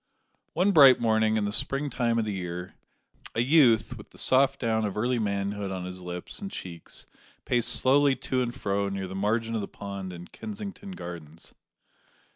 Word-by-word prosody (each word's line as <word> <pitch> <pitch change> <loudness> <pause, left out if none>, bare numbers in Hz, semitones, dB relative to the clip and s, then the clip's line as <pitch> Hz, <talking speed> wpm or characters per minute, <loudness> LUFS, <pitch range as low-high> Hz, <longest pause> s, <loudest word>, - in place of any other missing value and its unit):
One 185 +5 +3
bright 140 -8 +8
morning 110 -1 +2
in 105 - 0
the 100 - -2
spring 135 +6 0
time 120 -2 0
of 115 - +1
the 105 - -2
year, 90 -1 -5 0.6
a 115 - +2
youth 120 -5 +4
with 105 - -13
the - - -19
soft 130 +1 +3
down 110 -2 0
of 105 -1 -3
early 120 +3 +1
manhood 100 -1 -2
on 95 -1 -4
his 90 0 -7
lips 90 0 -3
and 200 - -4
cheeks, 85 - -7 0.4
paced 120 -2 +1
slowly 140 +1 +4
to 130 -1 -2
and 120 -1 -1
fro 100 -5 -1
near 95 -1 -4
the 95 - -8
margin 110 +4 0
of 110 - -1
the 100 - -4
pond 100 -2 -7
in 85 0 -9
Kensington 205 -2 -7
Gardens. 85 - -9
110 Hz, 185 wpm, -27 LUFS, 95-130 Hz, 0.6 s, bright